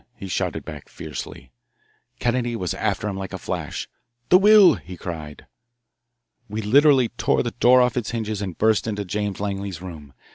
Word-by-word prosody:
he 95 - -8
shouted 90 - -2
back 75 -2 -9
fiercely. - - -8 0.7
Kennedy 120 -1 0
was 90 -6 -2
after 105 -1 -2
him 100 - -3
like 95 -1 -6
a - - -3
flash. - - -5 0.4
"The 180 - +7
will!" 205 -4 +7
he 90 -7 -9
cried. 80 -4 -7 1.0
We 110 +1 -4
literally 135 +2 +5
tore 135 +4 +2
the 120 - -3
door 125 +2 +5
off 125 - 0
its 120 -4 -2
hinges 110 -3 -3
and 95 -4 -5
burst 110 -1 +2
into 105 -2 -3
James 105 0 -3
Langley's 100 -3 -4
room. 80 -6 -10
105 Hz, 170 wpm, -23 LUFS, 95-120 Hz, 1.0 s, The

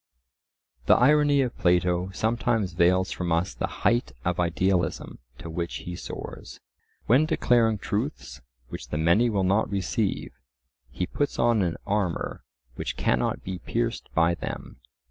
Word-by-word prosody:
The - - +7
irony 145 +1 +4
of 125 -3 -2
Plato 90 0 +2
sometimes 110 -2 0
veils 90 +2 +3
from 90 -2 -3
us 85 +4 +1
the - - -2 0.2
height 120 +1 +2
of 90 -1 0
idealism 90 +1 0 0.2
to 85 - -9
which 85 +1 -4
he 90 - -5
soars. - - -8 0.5
When 135 +8 +4
declaring 115 -6 +3
truths 105 - -4 0.3
which - - -7
the 75 - -3
many 85 +10 +3
will 100 -3 0
not 100 +4 +2
receive, 100 -3 -1 0.6
he 70 +7 -3
puts 145 +9 -2
on 115 -2 +3
an 85 -3 -1
armour 100 -10 -2 0.3
which - - -4
cannot - - 0
be 95 -1 -5
pierced 115 +5 -3
by 85 +1 +4
them. - - -7
95 Hz, 145 wpm, -26 LUFS, 85-115 Hz, 0.6 s, The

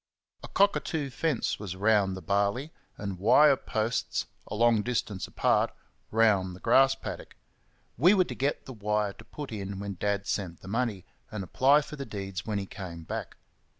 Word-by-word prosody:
A - - -8
cockatoo 160 -7 +1
fence 150 0 -1
was 95 -4 -5
round 100 -1 +2
the 95 - -9
barley; 100 - 0 0.2
and 100 -3 -5
wire 135 +8 +6
posts, 110 -2 -2 0.2
a - - -5
long 115 -1 +4
distance 105 -4 -2
apart, - - +2 0.4
round 100 -5 +3
the - - -12
grass 135 +5 +5
paddock. 135 - -7 0.6
We 180 +9 +6
were 185 - +5
to - - -6
get 140 +2 -1
the 130 - -8
wire 105 -2 -1
to 110 - -14
put 145 +3 -8
in 100 -2 -5
when 100 -1 -5
Dad 100 -1 0
sent 95 -4 -3
the - - -12
money; 110 -3 -1 0.2
and 105 -2 -5
apply 135 - +4
for 150 +1 -9
the 140 - -5
deeds 95 -2 -5
when 105 -2 -1
he 100 - -2
came 90 -4 -8
back. - - -5
105 Hz, 180 wpm, -29 LUFS, 100-130 Hz, 0.6 s, wire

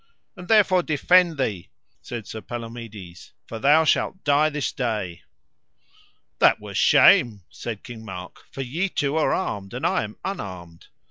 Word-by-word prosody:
And 180 -2 -11
therefore 200 -4 +4
defend 170 +2 +3
thee, 100 -9 -3 0.3
said 120 -3 -7
Sir 110 - -8
Palomides, 115 -8 -9
for 115 - -7
thou 150 +6 +5
shalt 185 +4 0
die 150 +1 +3
this 150 -1 -3
day. 105 -9 -3 1.2
That - - +5
were - - -9
shame, 105 -6 +5
said 115 -4 -7
King 120 -3 -10
Mark, 90 -5 -9
for 135 - -7
ye 165 +10 -2
two 145 -3 -1
are 160 - +2
armed 100 - -3
and 130 +6 -3
I 190 - +1
am 105 0 -8
unarmed. 90 - -7
120 Hz, 150 wpm, -23 LUFS, 105-155 Hz, 1.2 s, thou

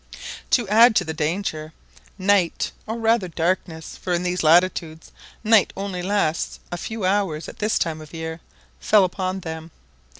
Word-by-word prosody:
To 240 -5 +2
add 225 +3 +6
to - - +4
the 160 - -3
danger, 155 -1 -3 0.4
night, 190 -3 +1 0.2
or 225 +1 -3
rather 225 -3 +2
darkness, 170 -1 -2
for 180 - -3
in 175 0 0
these 180 0 -1
latitudes 165 -1 +2 0.3
night 220 -3 +4
only 195 -2 -4
lasts 180 -4 -1
a 175 - -3
few 220 +2 -4
hours 185 -5 0
at - - -11
this 215 +1 +1
time 160 -1 -2
of 155 - -12
year, 160 0 -6 0.4
fell 210 -2 +4
upon 185 +1 -2
them. 160 -1 -7
180 Hz, 160 wpm, -23 LUFS, 160-205 Hz, 0.4 s, add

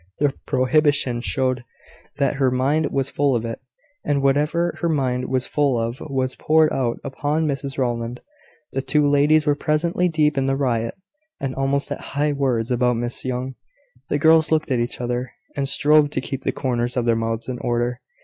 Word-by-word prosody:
The 145 -1 +1
prohibition 130 -2 +2
showed 130 -1 0 0.5
that 140 0 +1
her 135 -2 +3
mind 140 +5 +1
was 135 -1 -1
full 140 -2 +1
of 115 -1 -1
it: 115 - -5 0.4
and 140 -2 0
whatever 150 +5 +1
her 170 - +1
mind 130 -5 0
was 130 -1 0
full 140 -5 +1
of 115 +3 -3
was 130 -1 -1
poured 155 0 +3
out 120 -3 0
upon 145 +3 -1
Mrs 140 -2 -3
Rowland. 120 -2 -2 0.5
The 135 - -2
two 150 +2 +2
ladies 145 +2 +4
were 145 - +3
presently 165 +5 0
deep 150 -3 +2
in 135 - 0
the 135 - +1
riot, 115 -4 -1 0.4
and 135 -1 -3
almost 140 +2 0
at - - -4 0.2
high 150 +1 +2
words 130 -5 0
about 125 -1 +2
Miss 120 +1 -3
Young. 130 +1 -3 0.6
The - - +1
girls 160 +1 +4
looked 155 -2 +1
at 125 - +2
each 120 +1 -2
other, 125 +1 -3 0.2
and 140 -1 -1
strove 150 +1 +4
to 140 - -2
keep 135 +1 -5
the - - +2
corners 125 -1 -2
of 120 - +1
their 115 -1 +3
mouths 115 0 -2
in 125 -2 -4
order. 120 +1 -1
135 Hz, 190 wpm, -22 LUFS, 125-145 Hz, 0.6 s, ladies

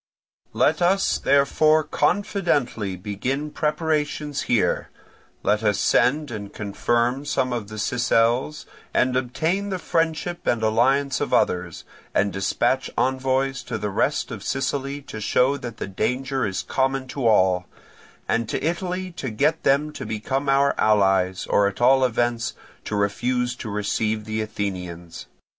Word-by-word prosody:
"Let 130 +9 +2
us, 190 +3 +2
therefore, 155 +3 +3
confidently 145 - 0
begin 130 +11 -3
preparations 150 -2 -1
here; 120 - +1 0.5
let 105 +1 +2
us 105 -2 +1
send 145 +1 +2
and 100 -3 -6
confirm 120 +5 0
some 130 -3 0
of 115 -4 -3
the 110 +1 -8
Sicels, 120 +4 +1 0.3
and 125 0 +2
obtain 160 +11 -1
the 190 - -2
friendship 165 0 -1
and 115 -2 +1
alliance 130 +5 +2
of - - +1
others, 90 -2 0 0.3
and 100 -1 +2
dispatch 120 +7 0
envoys 130 0 0
to 120 -3 -4
the 105 -1 -3
rest - - 0
of - - -6
Sicily 140 +1 -2
to 110 -6 -8
show 125 +5 +2
that 120 -4 -7
the - - -4
danger 125 +6 -1
is 95 - -3
common 135 0 0
to 130 -3 -1
all, 95 -4 +3 0.6
and 115 -1 0
to - - -2
Italy 180 +2 -2
to 140 -6 -5
get 150 +9 +1
them 150 +2 +2
to - - -6
become 130 +6 -2
our 140 +1 +4
allies, 95 -3 +2
or 100 - +3
at 100 - -5
all 130 +2 +5
events 120 -1 0 0.3
to 105 - -3
refuse 120 +5 0
to 110 - -6
receive 105 +1 -1
the 110 0 -2
Athenians. 90 -5 -5
125 Hz, 145 wpm, -23 LUFS, 110-140 Hz, 0.6 s, all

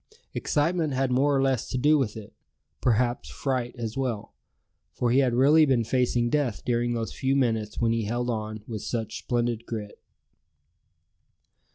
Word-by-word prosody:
Excitement 155 0 0
had 130 0 0
more 140 +3 +3
or 135 - +2
less 135 -3 0
to - - -2
do 150 +5 +4
with 125 -7 0
it, 105 -2 -10 0.5
perhaps 120 0 +1
fright 130 -3 -2
as 115 -2 -4
well; 125 -6 -3 0.6
for 120 -1 0
he 130 - +4
had 125 -3 +2
really 145 +5 +6
been 130 -5 +3
facing 120 0 +1
death 120 -7 -1
during 120 0 0
those 115 -1 -3
few 135 0 0
minutes 110 -5 0
when 115 -1 +2
he 115 -1 0
held 120 +3 -2
on 110 -2 -3
with 110 -4 -5
such 115 -1 -3
splendid 120 -2 -1
grit. 105 -3 -6
120 Hz, 165 wpm, -26 LUFS, 115-135 Hz, 0.6 s, really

